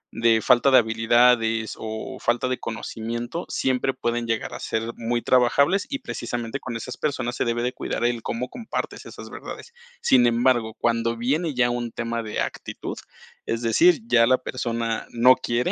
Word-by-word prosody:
de 115 Hz, -1 st, +3 dB
falta 125 Hz, +4 st, +4 dB
de 130 Hz, -, +7 dB
habilidades 115 Hz, 0 st, +3 dB
o 110 Hz, +4 st, -6 dB
falta 120 Hz, +2 st, 0 dB
de 130 Hz, -, -2 dB
conocimiento, 120 Hz, +6 st, -5 dB
siempre 130 Hz, 0 st, 0 dB
pueden 120 Hz, 0 st, -2 dB
llegar 115 Hz, -1 st, -2 dB
a -, -, -6 dB
ser 115 Hz, +1 st, -2 dB
muy 120 Hz, +1 st, -2 dB
trabajables 140 Hz, +10 st, +3 dB
y 275 Hz, 0 st, -3 dB
precisamente 120 Hz, +2 st, -4 dB
con 125 Hz, -, -6 dB
esas 125 Hz, +2 st, -7 dB
personas 120 Hz, -5 st, -2 dB
se -, -, -1 dB
debe 120 Hz, 0 st, -1 dB
de 125 Hz, +1 st, -1 dB
cuidar 120 Hz, -, -3 dB
el 120 Hz, -1 st, 0 dB
cómo 120 Hz, +3 st, -3 dB
compartes 235 Hz, -3 st, -5 dB
esas -, -, -10 dB
verdades. 470 Hz, -, -9 dB, 0.3 s
Sin 125 Hz, -2 st, +5 dB
embargo, 120 Hz, -2 st, +2 dB
cuando 115 Hz, 0 st, 0 dB
viene 145 Hz, +5 st, -1 dB
ya 120 Hz, -1 st, +3 dB
un 120 Hz, -1 st, -3 dB
tema 115 Hz, 0 st, -3 dB
de 110 Hz, -2 st, -3 dB
actitud, -, -, -5 dB, 0.5 s
es 115 Hz, +1 st, -2 dB
decir, 170 Hz, -, +4 dB
ya 115 Hz, -, +4 dB
la 130 Hz, +1 st, +4 dB
persona 115 Hz, -3 st, -3 dB
no 125 Hz, +2 st, +6 dB
quiere 120 Hz, +2 st, -1 dB
120 Hz, 170 wpm, -24 LUFS, 115-130 Hz, 0.5 s, de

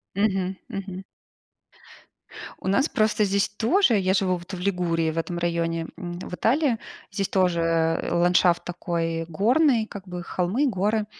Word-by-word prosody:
Мгм, 195 Hz, -2 st, 0 dB
мгм. 190 Hz, -1 st, -6 dB, 1.6 s
У -, -, -9 dB
нас 270 Hz, +10 st, +3 dB
просто 215 Hz, -1 st, +2 dB
здесь 200 Hz, 0 st, +1 dB
тоже. 235 Hz, -, +2 dB
Я 190 Hz, -1 st, +1 dB
живу 185 Hz, -2 st, +2 dB
вот 175 Hz, +3 st, -10 dB
в 185 Hz, -, -4 dB
Лигурии, 175 Hz, -3 st, 0 dB
в 165 Hz, -, -4 dB
этом 170 Hz, +1 st, -3 dB
районе, 165 Hz, -1 st, -1 dB
м, 175 Hz, -2 st, -6 dB
в 180 Hz, -, -7 dB
Италии, 255 Hz, -, +2 dB, 0.3 s
здесь 195 Hz, -1 st, -1 dB
тоже 165 Hz, -3 st, +2 dB
ландшафт 175 Hz, 0 st, +3 dB
такой 165 Hz, -2 st, -2 dB
горный, 230 Hz, -, +3 dB
как 200 Hz, -3 st, -10 dB
бы 180 Hz, -1 st, -5 dB
холмы, 190 Hz, +14 st, 0 dB
горы. 210 Hz, -1 st, 0 dB
185 Hz, 145 wpm, -25 LUFS, 175-210 Hz, 1.6 s, нас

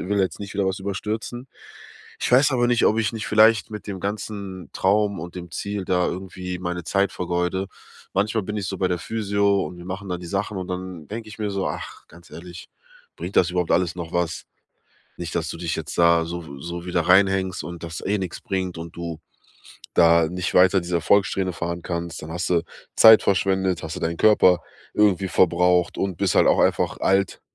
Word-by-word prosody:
und -, -, -6 dB
will 105 Hz, -, +2 dB
jetzt 95 Hz, -3 st, -1 dB
nicht 100 Hz, 0 st, -7 dB
wieder 100 Hz, -1 st, 0 dB
was 95 Hz, +1 st, -2 dB
überstürzen. 105 Hz, +5 st, -4 dB, 0.7 s
Ich -, -, -1 dB
weiß 135 Hz, +4 st, +6 dB
aber 120 Hz, -2 st, +2 dB
nicht, 120 Hz, -1 st, +3 dB
ob 110 Hz, -, +2 dB
ich 110 Hz, -2 st, 0 dB
nicht 110 Hz, -2 st, -5 dB
vielleicht 110 Hz, -1 st, +4 dB
mit 105 Hz, -1 st, -8 dB
dem 100 Hz, -2 st, -5 dB
ganzen 100 Hz, -2 st, -5 dB
Traum 100 Hz, +1 st, +1 dB
und 85 Hz, +1 st, -8 dB
dem 90 Hz, -1 st, -8 dB
Ziel 100 Hz, +1 st, -4 dB
da 90 Hz, -1 st, +1 dB
irgendwie 90 Hz, -1 st, -5 dB
meine 90 Hz, -1 st, -4 dB
Zeit 100 Hz, +3 st, +1 dB
vergeude. 90 Hz, +2 st, -1 dB, 0.5 s
Manchmal 105 Hz, +3 st, +1 dB
bin 105 Hz, +2 st, -4 dB
ich 100 Hz, -, -3 dB
so 95 Hz, -2 st, -4 dB
bei 95 Hz, -, +1 dB
der 90 Hz, -1 st, -1 dB
Physio 100 Hz, +1 st, 0 dB
und -, -, -9 dB
wir 85 Hz, -, -10 dB
machen 95 Hz, +1 st, -6 dB
da 90 Hz, -1 st, -3 dB
die 90 Hz, -, -9 dB
Sachen. 100 Hz, +3 st, -2 dB
Und 90 Hz, -, -5 dB
dann 90 Hz, -4 st, -6 dB
denke 110 Hz, 0 st, -6 dB
ich 105 Hz, -, -11 dB
mir 105 Hz, -1 st, -2 dB
so: 100 Hz, -1 st, -2 dB
„Ach, -, -, -7 dB
ganz 85 Hz, +2 st, -17 dB
ehrlich, 85 Hz, -2 st, -10 dB, 0.5 s
bringt 90 Hz, +4 st, -6 dB
das 85 Hz, -, +4 dB
überhaupt 90 Hz, -1 st, 0 dB
alles 90 Hz, -1 st, +1 dB
noch 85 Hz, -2 st, -6 dB
was? 85 Hz, 0 st, -1 dB, 0.7 s
Nicht, 85 Hz, -2 st, -5 dB
dass 80 Hz, -2 st, -1 dB
du -, -, -5 dB
dich 85 Hz, -2 st, -2 dB
jetzt -, -, -6 dB
da 85 Hz, -1 st, +4 dB
so 85 Hz, 0 st, -6 dB
w 70 Hz, -2 st, -10 dB
so 85 Hz, +1 st, -6 dB
wieder 90 Hz, -1 st, 0 dB
reinhängst 95 Hz, +1 st, +3 dB
und 85 Hz, -1 st, -8 dB
das 80 Hz, -1 st, -6 dB
eh 105 Hz, +2 st, +1 dB
nix 95 Hz, -3 st, -5 dB
bringt 95 Hz, -6 st, -3 dB
und 85 Hz, 0 st, -8 dB
du 85 Hz, -2 st, -6 dB, 0.8 s
da 85 Hz, -1 st, +5 dB
nicht 90 Hz, +1 st, -3 dB
weiter 95 Hz, +1 st, +5 dB
diese 85 Hz, 0 st, -2 dB
Erfolgssträhne 95 Hz, +2 st, +2 dB
fahren 85 Hz, 0 st, -4 dB
kannst. 85 Hz, -1 st, -4 dB
Dann 75 Hz, -, -8 dB
hast 90 Hz, +1 st, -3 dB
du 85 Hz, -2 st, +3 dB, 0.3 s
Zeit 110 Hz, -1 st, +9 dB
verschwendet, 95 Hz, -2 st, +1 dB
hast 80 Hz, -, -5 dB
du -, -, -6 dB
deinen 85 Hz, +1 st, -2 dB
Körper 95 Hz, -4 st, +5 dB, 0.3 s
irgendwie 100 Hz, -3 st, +3 dB
verbraucht 90 Hz, 0 st, +2 dB
und 95 Hz, -4 st, -2 dB
bist -, -, +1 dB
halt -, -, +5 dB
auch -, -, +4 dB
einfach -, -, +1 dB
alt." 95 Hz, 0 st, +1 dB
95 Hz, 210 wpm, -23 LUFS, 85-100 Hz, 0.8 s, Zeit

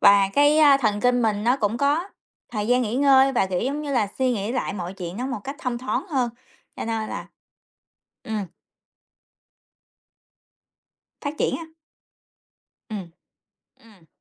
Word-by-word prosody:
và 200 Hz, -1 st, +6 dB
cái, 290 Hz, +2 st, +5 dB
a, 290 Hz, -3 st, +7 dB
thần 215 Hz, -6 st, 0 dB
kinh 245 Hz, +1 st, +3 dB
mình 210 Hz, -2 st, 0 dB
nó 245 Hz, +3 st, +3 dB
cũng 215 Hz, -2 st, 0 dB
có 290 Hz, +8 st, +1 dB, 0.4 s
thời 210 Hz, -2 st, -2 dB
gian 250 Hz, +2 st, +3 dB
nghỉ 220 Hz, 0 st, -2 dB
ngơi 270 Hz, -1 st, +5 dB
và, 215 Hz, -6 st, +2 dB
kiểu 185 Hz, -1 st, -1 dB
giống 280 Hz, +5 st, -2 dB
như 285 Hz, -2 st, -3 dB
là, 225 Hz, -6 st, +2 dB
suy 260 Hz, -1 st, +2 dB
nghĩ 215 Hz, +1 st, -2 dB
lại 255 Hz, -, -1 dB
mọi 180 Hz, -2 st, -5 dB
chuyện 180 Hz, -1 st, -6 dB
nó 250 Hz, +3 st, -3 dB
một 255 Hz, -5 st, -4 dB
cách 275 Hz, +1 st, -5 dB
thông 250 Hz, -6 st, -3 dB
thoáng 260 Hz, +9 st, -2 dB
hơn, 260 Hz, -7 st, 0 dB, 0.5 s
cho -, -, -4 dB
nên 225 Hz, -1 st, -2 dB
là -, -, -5 dB, 1.0 s
ừm. 215 Hz, -3 st, -3 dB, 2.7 s
Phát 290 Hz, 0 st, -4 dB
triển -, -, +1 dB
á? 335 Hz, -, -8 dB, 1.2 s
Ừm, 195 Hz, -5 st, -5 dB, 0.7 s
ừm. 205 Hz, -7 st, -20 dB
240 Hz, 160 wpm, -24 LUFS, 210-275 Hz, 2.7 s, a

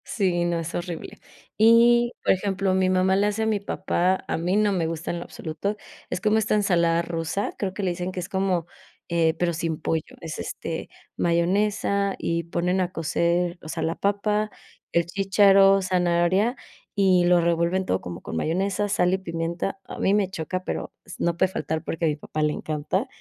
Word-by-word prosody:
Sí, 180 Hz, -5 st, 0 dB
no, 170 Hz, -1 st, 0 dB
es 165 Hz, 0 st, -5 dB
horrible. 175 Hz, -1 st, -5 dB, 0.4 s
Y, 235 Hz, +2 st, +6 dB
por -, -, +4 dB
ejemplo, 195 Hz, 0 st, 0 dB
mi 185 Hz, 0 st, +2 dB
mamá 185 Hz, +1 st, +3 dB
le 200 Hz, +2 st, +3 dB
hace 210 Hz, +2 st, -1 dB
a -, -, +1 dB
mi 215 Hz, -2 st, +1 dB
papá, 185 Hz, -2 st, 0 dB
a -, -, -1 dB
mí 175 Hz, +4 st, 0 dB
no 210 Hz, 0 st, +3 dB
me 175 Hz, -4 st, 0 dB
gusta 165 Hz, 0 st, -4 dB
en 175 Hz, -, -3 dB
lo -, -, -5 dB
absoluto, 190 Hz, +6 st, -4 dB, 0.3 s
es 180 Hz, -, -3 dB
como 215 Hz, +2 st, +3 dB
esta 215 Hz, 0 st, +1 dB
ensalada 170 Hz, -5 st, +2 dB
rusa, 170 Hz, +4 st, -3 dB
creo 190 Hz, -2 st, -2 dB
que 200 Hz, -, -4 dB
le 185 Hz, -, +1 dB
dicen 180 Hz, +1 st, -4 dB
que 185 Hz, -, -5 dB
es 180 Hz, -, -5 dB
como, 190 Hz, -4 st, 0 dB, 0.4 s
eh, 165 Hz, -2 st, +2 dB
pero 175 Hz, 0 st, 0 dB
sin 165 Hz, -1 st, -2 dB
pollo. 160 Hz, -1 st, -2 dB
Es, 160 Hz, -2 st, -6 dB
este, 165 Hz, -1 st, -5 dB, 0.3 s
mayonesa 200 Hz, +3 st, +1 dB
y 170 Hz, 0 st, -1 dB
ponen 180 Hz, +2 st, 0 dB
a 180 Hz, -1 st, -1 dB
cocer, 170 Hz, +1 st, 0 dB
o -, -, -11 dB
sea, -, -, -3 dB
la 165 Hz, +1 st, -1 dB
papa, 210 Hz, +1 st, 0 dB, 0.4 s
el 170 Hz, 0 st, +2 dB
chícharo, 195 Hz, +1 st, +5 dB
zanahoria, 185 Hz, +4 st, +2 dB, 0.4 s
y 190 Hz, -3 st, +4 dB
lo 175 Hz, 0 st, +5 dB
revuelven 170 Hz, +2 st, +1 dB
todo 95 Hz, -, 0 dB
como 90 Hz, +1 st, -7 dB
con -, -, -6 dB
mayonesa, 190 Hz, -, 0 dB
sal 180 Hz, -2 st, +2 dB
y -, -, +3 dB
pimienta. 170 Hz, +2 st, -3 dB
A -, -, -8 dB
mí 195 Hz, -, +2 dB
me 205 Hz, -3 st, +2 dB
choca, 185 Hz, +1 st, -4 dB
pero -, -, -4 dB
s 185 Hz, -, -9 dB
no 170 Hz, -1 st, 0 dB
puede 190 Hz, +1 st, +2 dB
faltar 160 Hz, -1 st, -3 dB
porque 165 Hz, 0 st, -2 dB
a -, -, +3 dB
mi 150 Hz, -, +1 dB
papá 155 Hz, +1 st, -5 dB
le 150 Hz, 0 st, +2 dB
encanta 155 Hz, -, -2 dB
180 Hz, 200 wpm, -25 LUFS, 170-195 Hz, 0.4 s, Y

